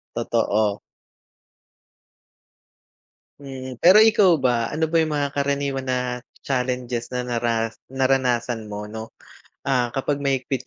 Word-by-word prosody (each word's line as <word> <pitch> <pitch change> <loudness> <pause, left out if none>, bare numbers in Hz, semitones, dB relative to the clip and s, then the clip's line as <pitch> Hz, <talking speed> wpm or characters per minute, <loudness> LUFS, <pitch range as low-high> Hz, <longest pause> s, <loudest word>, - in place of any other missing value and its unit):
Totoo. 105 -1 0 2.6
Mm, 130 -2 -8
pero 185 +4 +7
ikaw 200 -6 +5
ba, 120 -4 +1
ano 160 +2 -1
ba - - +3
yung 155 -1 0
mga 140 -1 -1
karaniwan 140 -1 -1
na 130 0 +1 0.5
challenges 125 -2 -2
na 125 - -1
nara 115 -2 -1 0.2
naranasan 125 -4 0
mo 105 0 -5
'no? 110 +1 -7 0.6
Ah, 125 -3 +1
kapag 140 +1 -1
mahigpit 135 -1 -1
130 Hz, 115 wpm, -23 LUFS, 120-140 Hz, 2.6 s, pero